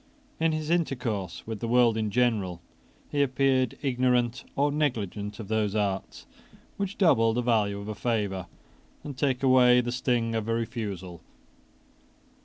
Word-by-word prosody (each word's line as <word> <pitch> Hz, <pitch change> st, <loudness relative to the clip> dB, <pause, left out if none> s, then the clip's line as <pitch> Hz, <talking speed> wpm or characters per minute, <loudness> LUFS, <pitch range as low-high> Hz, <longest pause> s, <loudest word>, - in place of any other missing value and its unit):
In 165 Hz, 0 st, +2 dB
his 155 Hz, 0 st, -2 dB
intercourse 125 Hz, -, -2 dB
with 110 Hz, -2 st, -5 dB
the 115 Hz, -, -3 dB
world 120 Hz, -1 st, +4 dB
in 110 Hz, -1 st, -1 dB
general 105 Hz, -7 st, 0 dB, 0.5 s
he 145 Hz, -, +1 dB
appeared 130 Hz, -2 st, +1 dB
ignorant 125 Hz, -2 st, +1 dB
or 145 Hz, +1 st, +2 dB
negligent 105 Hz, -8 st, -2 dB
of 110 Hz, -, -7 dB
those 110 Hz, -1 st, 0 dB
arts 100 Hz, -2 st, -2 dB, 0.5 s
which 200 Hz, -1 st, -4 dB
double 115 Hz, -, +4 dB
the 125 Hz, -, 0 dB
value 105 Hz, -4 st, +1 dB
of 100 Hz, -, -8 dB
a 110 Hz, -, -3 dB
favour 100 Hz, -4 st, -2 dB, 0.6 s
and 145 Hz, -2 st, -7 dB
take 130 Hz, 0 st, 0 dB
away 125 Hz, -2 st, +6 dB
the 120 Hz, 0 st, -1 dB
sting 120 Hz, -2 st, 0 dB
of 110 Hz, -1 st, -2 dB
a 115 Hz, -, +1 dB
refusal. 100 Hz, -7 st, -5 dB
120 Hz, 150 wpm, -27 LUFS, 105-130 Hz, 0.6 s, away